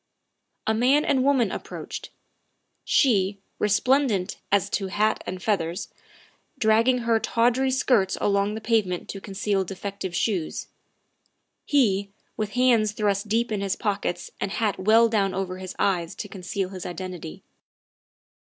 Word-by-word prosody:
A 220 - +2
man 260 +7 +3
and 265 -2 +2
woman 265 -7 +3
approached. - - -6 0.7
She, 200 -7 +3 0.2
resplendent 210 -2 +2
as 200 -3 +3
to 195 - -1
hat 215 +3 0
and 185 0 -5
feathers, 180 -4 -1 0.7
dragging 230 +2 +4
her 230 -1 +3
tawdry 245 +4 +2
skirts 250 -7 +2
along 200 +1 +1
the 220 - -5
pavement 215 -6 0
to 195 - -6
conceal 195 0 -1
defective 195 -1 -5
shoes; 180 -5 -1 1.0
he, 205 -8 +2 0.3
with 215 -1 -3
hands 235 -4 +3
thrust 205 -1 0
deep 230 +2 0
in 205 -2 -1
his 195 -1 -1
pockets 200 -4 -2
and 195 - -2
hat 215 -3 0
well 220 +4 +5
down 200 -4 +1
over 185 -1 -3
his 185 -1 -7
eyes 175 -4 0
to - - -6
conceal 190 0 -4
his 185 -2 -7
identity. 180 - -7
205 Hz, 135 wpm, -25 LUFS, 190-230 Hz, 1.0 s, well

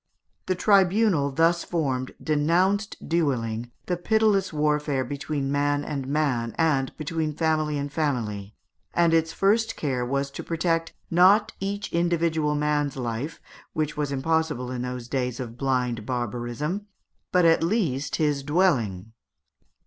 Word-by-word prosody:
The 185 - +1
tribunal 195 -5 +3
thus 165 +4 +2
formed 135 -7 -2
denounced 180 +7 +1
duelling, 120 -8 0 0.2
the 180 - -1
pitiless 210 0 +2
warfare 150 -3 0
between 140 +1 -3
man 145 0 +1
and 140 -3 -4
man, 135 -6 0
and 145 -5 +2
between 155 0 -2
family 155 -2 +1
and 140 0 -4
family, 110 -10 -2 0.4
and 170 -1 +4
its 165 0 +2
first 220 +5 +2
care 130 -5 -1
was 140 +2 -1
to - - -7
protect, 165 0 -1 0.2
not 185 +5 +5
each 200 +1 -4
individual 165 -3 +1
man's 150 -1 0
life, 125 +5 -4 0.3
which 155 -1 -1
was 145 -1 -2
impossible 145 -2 0
in 125 -1 -3
those 125 -1 -5
days 125 -1 -2
of 120 -3 -6
blind 125 -3 -1
barbarism, 125 - -3 0.4
but 180 -1 +4
at 165 0 +5
least 165 - 0
his 150 -3 +1
dwelling. 125 - +1
150 Hz, 135 wpm, -25 LUFS, 130-170 Hz, 0.4 s, not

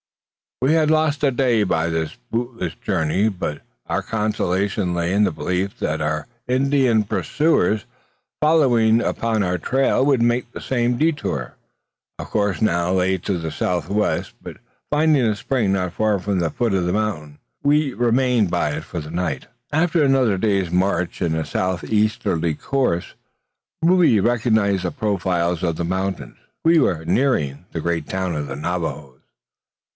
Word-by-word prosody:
We 140 +4 +4
had 155 -2 +3
lost 155 -2 +1
a 140 - +4
day 120 -4 +2
by 85 -4 0
this 80 -1 -3
bootless 115 -7 -3
journey; 85 +7 0
but 90 -7 -4 0.3
our - - -1
consolation 100 -3 -1
lay 85 +1 -1
in 105 +2 +3
the 95 - 0
belief 90 +5 -2
that 75 0 -1
our 75 +3 -2 0.2
Indian 130 -3 +2
pursuers, 110 - +1 0.5
following 120 -8 +4
upon 115 -2 -1
our 90 -1 0
trail, 130 +6 +1
would 135 -4 +3
make 120 +1 +1
the - - -8
same 120 -1 0
detour. 155 -1 -1 0.6
Our - - -6
course 100 -1 -1
now 85 -4 +1
lay 95 0 +2
to 95 +1 -2
the 80 -1 -4
south 90 -2 -2
west; 105 +1 0
but - - -9 0.3
finding 150 -2 +3
a 110 -2 +1
spring 105 -2 0
not 90 -2 -1
far 105 0 +1
from 100 0 -1
the 85 -2 0
foot 120 -4 -1
of 90 -2 0
the 90 - 0
mountain, 80 -9 -3 0.2
we 145 -1 +2
remained 120 -3 +2
by - - 0
it - - -4
for 85 - -6
the 75 0 -8
night. 85 -5 -3 0.2
After 160 +1 +2
another 130 -7 +3
day's 95 -3 0
march 90 -1 0
in 80 -2 0
a 80 -1 -2
south 90 +4 -2
easterly 105 -7 0
course, 125 - -1 0.7
Rube 165 - +4
recognised 110 -5 +2
the 90 - -1
profiles 90 - -1
of 85 -2 0
the 85 - -3
mountains. 95 +1 -3 0.3
We 165 0 +5
were 85 - +1
nearing 90 - 0
the 80 - -4
great 85 -2 -2
town 95 -2 -2
of 75 -1 -3
the 65 - -5
Navajoes. 75 -4 -4
100 Hz, 160 wpm, -21 LUFS, 85-125 Hz, 0.7 s, We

